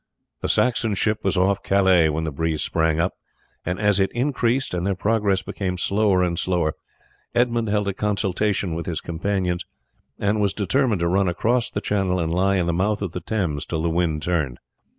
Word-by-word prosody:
The - - -3
Saxon 120 -4 +2
ship 110 +2 0
was 95 -1 +1
off 95 +2 +2
Calais 95 -4 +4
when 80 +1 -1
the 80 - -2
breeze 80 +1 -1
sprang 80 -1 +1
up, 90 +3 +1 0.5
and 90 +2 -3
as 105 -1 +3
it 95 - +2
increased 125 -1 0
and 90 -1 -1
their 100 +1 0
progress 100 -1 +1
became 90 -2 -3
slower 100 0 +2
and 85 -1 -1
slower 85 -4 0 0.6
Edmund 120 -1 +2
held 105 -1 0
a 100 - 0
consultation 100 -2 0
with 85 0 -4
his 80 -4 -2
companions 90 +1 -2 0.5
and 105 +1 0
it - - +1
was 100 -2 +1
determined 110 0 +1
to 85 - +2
run 95 +2 +2
across 120 +7 +1
the - - -3
channel 95 -3 0
and 80 -1 -1
lie 95 +2 +2
in 90 -3 +1
the 85 - 0
mouth 100 +4 0
of 95 - -3
the 90 - -5
Thames 80 -7 -2
till 80 -1 -3
the 85 - +1
wind 80 -3 0
turned. 75 -9 -1
95 Hz, 200 wpm, -23 LUFS, 85-105 Hz, 0.6 s, Calais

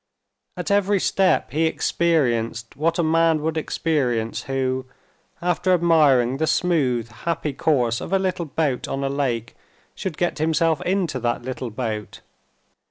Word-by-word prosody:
At - - -3
every 200 0 +3
step 185 -10 +2
he 160 +4 +2
experienced 120 -10 0
what 165 +4 0
a 170 - +2
man 165 -1 +2
would 160 0 -1
experience 130 -8 -1
who, 130 -1 -1 0.6
after 180 +1 +2
admiring 145 -7 +3
the 160 +2 0
smooth, 140 -8 +1
happy 155 +4 -3
course 125 -6 +1
of - - -6
a 195 - +4
little 185 -2 -1
boat 145 -3 -1
on 135 0 -3
a 135 - 0
lake, 125 -5 -2 0.4
should 185 -6 -5
get 175 -3 -1
himself 160 0 +1
into 180 -7 -1
that 120 0 -1
little 130 -1 -4
boat. 110 -2 -5
150 Hz, 145 wpm, -22 LUFS, 125-165 Hz, 0.6 s, a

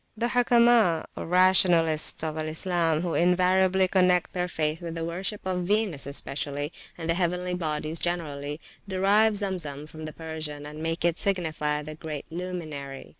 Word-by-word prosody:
The 235 +2 0
Hukama, 235 -7 +4
or - - -6
Rationalists 175 -4 +4
of 155 -1 -2
Al 155 0 -3
Islam, 165 0 +1
who 175 -2 -2
invariably 185 +1 +3
connect 180 -1 +2
their 180 -1 -1
faith 155 -1 -2
with 170 -1 -6
the 165 0 -3
worship 190 +5 -3
of 180 -1 -1
Venus, 205 -9 0
especially, 145 +1 -3 0.2
and 165 -2 -5
the 165 - +3
heavenly 180 +1 -1
bodies 155 -2 -2
generally, 150 -4 -3 0.3
derive 200 +3 +3
Zemzem 170 -8 -3
from 155 0 -9
the 155 - -7
Persian, 155 -2 -6
and 150 +1 -8
make 165 +1 -2
it 170 0 +1
signify 155 -6 -1
the 155 +1 -7
great 155 -2 -7
luminary. 155 -6 -6
170 Hz, 160 wpm, -26 LUFS, 155-185 Hz, 0.3 s, Hukama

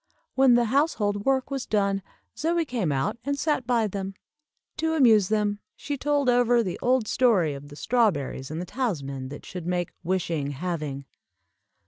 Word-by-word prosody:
When 265 -2 +5
the 240 0 +3
household 210 -9 +1
work 265 0 +1
was 270 -2 -3
done 200 -2 +1 0.3
Zoie 335 +1 0
came 230 - -1
out 205 +12 -1
and 280 +2 -1
sat 290 -4 0
by 235 -3 +2
them. 195 -1 -4 0.6
To 320 +1 0
amuse 225 -9 +5
them 210 -1 0 0.2
she 290 - -4
told 285 0 0
over 245 -1 +4
the 185 -4 -4
old 250 -2 +2
story 205 - +3
of 140 +1 -9
the 145 - -12
strawberries 155 - 0
and 155 +2 -4
the 180 - -4
talisman 140 - -3
that 145 - -9
should 180 -2 -7
make 175 -1 -1
"wishing 165 -5 -1
having." 150 -3 -4
210 Hz, 165 wpm, -26 LUFS, 170-255 Hz, 0.6 s, When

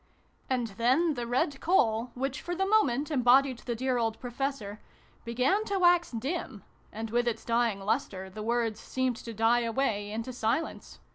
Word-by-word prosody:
And 255 -2 +1
then 300 +8 +3
the 240 -3 -4
red 265 +3 0
coal, 235 -9 +2
which 265 +1 -3
for 350 0 -4
the 385 +2 0
moment 310 - +2
embodied 260 -1 +4
the 240 - -4
dear 255 +1 0
old 225 -1 -1
Pro 245 -1 -6
fessor, 240 -6 -3 0.5
began 255 - +1
to 400 -2 -1
wax 350 -1 +4
dim, 245 - -4 0.3
and 220 0 -5
with 240 +1 +1
its 235 - -2
dying 230 -3 +1
lustre 195 -2 -2
the 190 +3 -8
words 230 -1 0
seemed 260 -2 -1
to 230 - -8
die 225 +2 +3
away 225 -3 -1
into 225 +4 -4
si 225 +2 +1
lence. 330 - -9
240 Hz, 180 wpm, -29 LUFS, 225-275 Hz, 0.5 s, embodied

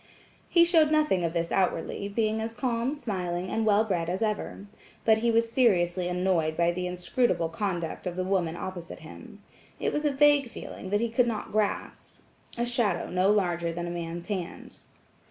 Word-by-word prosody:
He 340 -1 +6
showed 325 -3 +4
nothing 300 - +2
of 165 -1 -1
this 170 -1 -1
outwardly, 190 +1 0
being 220 +1 0
as 225 +1 -4
calm, 245 +2 -1
smiling 185 -8 -3
and 220 0 0
well 210 +1 +5
bred 175 -6 -1
as 185 +5 -1
ever. 210 -2 -3 0.4
But 220 -1 +5
he 235 +1 +1
was 230 0 +2
seriously 185 -7 +2
annoyed 180 -3 0
by 170 0 +3
the 180 +1 -3
inscrutable 180 -1 0
conduct 175 -1 -3
of 175 - -3
the 185 - -1
woman 180 -3 0
opposite 175 -1 -7
him. - - -12 0.4
It - - -1
was 300 - -1
a 295 - +2
vague 285 -2 +4
feeling 190 - -8
that 205 +2 +1
he 235 - 0
could 240 +2 +2
not 220 -3 -3
grasp–a 215 +2 -4
shadow 230 -7 0
no 185 +2 +2
larger 175 -5 +1
than 170 +1 -4
a 175 - -4
man's 170 0 -5
hand. 185 -3 -6
195 Hz, 180 wpm, -28 LUFS, 175-230 Hz, 0.4 s, He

